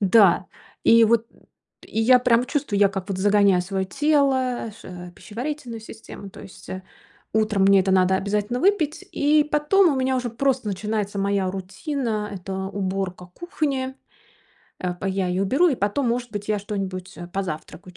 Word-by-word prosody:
Да, 195 -2 +5 0.4
и 230 0 +7
вот 230 +1 +2 0.6
и 225 - -2
я 250 +3 +6
прям 245 -1 +3
чувствую, 265 -8 -1
я 200 - +5
как 195 0 -5
вот 195 -2 -3
загоняю 200 -1 +4
своё 190 +1 -2
тело 265 -2 +1
ш - - -11 0.2
в - - -22
пищеварительную 240 +3 -6
систему, 220 -2 -11
то - - -12
есть, 190 - -13
э, 185 0 -5 0.5
утром 215 -2 +2
мне 195 0 +6
это 190 +1 0
надо 190 0 +4
обязательно 210 +5 -1
выпить, 330 -3 +1
и 295 +1 +3
потом 300 +4 +3
у - - -2
меня 260 0 +1
уже 250 -1 -2
просто 260 -1 0
начинается 205 0 -2
моя 195 -1 0
рутина- 210 - -3
это 190 +1 -6
уборка 190 -1 -3
кухни. 275 -6 -2 0.8
А, 180 -1 -2
по 185 +2 -6
я 190 -1 0
её 180 +2 0
уберу, 275 - +3
и 295 - +1
потом, 235 +5 0
может 240 0 -2
быть, 205 0 -5
я 210 - +1
что-нибудь, 195 -2 -5
э, 175 0 -8
позавтракаю, 180 -1 -6
210 Hz, 170 wpm, -23 LUFS, 190-260 Hz, 0.8 s, и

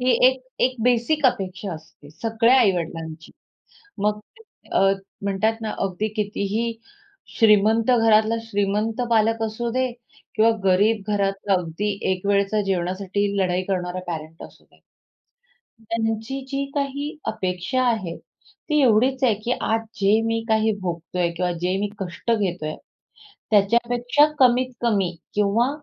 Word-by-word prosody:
ही 255 +1 +2 0.2
एक 260 0 -2 0.2
एक 255 0 +1
बेसिक 250 +5 +2
अपेक्षा 195 -5 -2
असते. 155 -2 -14
सगळ्या 230 +7 +2
आई-वडिलांची. 165 -5 -2 0.7
मग 210 +1 0 0.5
अ, - - +3 0.4
म्हणतात 200 +3 +1
ना, 220 - -2
अगदी 195 +2 -1
कितीही 210 +2 -1 0.7
श्रीमंत 220 +2 +4
घरातला 220 0 +4
श्रीमंत 210 +2 -1
पालक 225 0 +2
असू 225 +2 -2
दे 255 +1 0 0.5
किंवा 225 +1 +5
गरीब 200 +3 +3
घरातला 195 0 0
अगदी 180 +3 -2 0.2
एक 185 +1 -4
वेळच्या 200 +1 +2
जेवणासाठी 195 +1 -1
लढाई 185 -1 +1
करणारा 180 -1 -2
पॅरेंट 160 -1 -6
असू - - -16
दे. - - -27 1.0
त्यांची 225 +3 -2
जी 275 0 -2
काही 285 +1 -3
अपेक्षा 180 +7 -1
आहे, 185 -7 -3 0.5
ती 300 -1 +3
एवढीच 255 +3 +3
आहे 230 -4 +4
की 245 - 0
आज 225 0 +1 0.2
जे 205 +3 +4
मी 225 0 0
काही 220 0 +3
भोगतोय 175 0 -2
किंवा 180 +1 -1
जे 180 +1 +1
मी 205 - -1
कष्ट 190 +4 -5
घेतोय, 180 -8 -1 0.8
त्याच्यापेक्षा 240 +6 +3
कमीत-कमी 240 -6 +2 0.2
किंवा 210 +4 +2
210 Hz, 125 wpm, -23 LUFS, 185-230 Hz, 1.0 s, किंवा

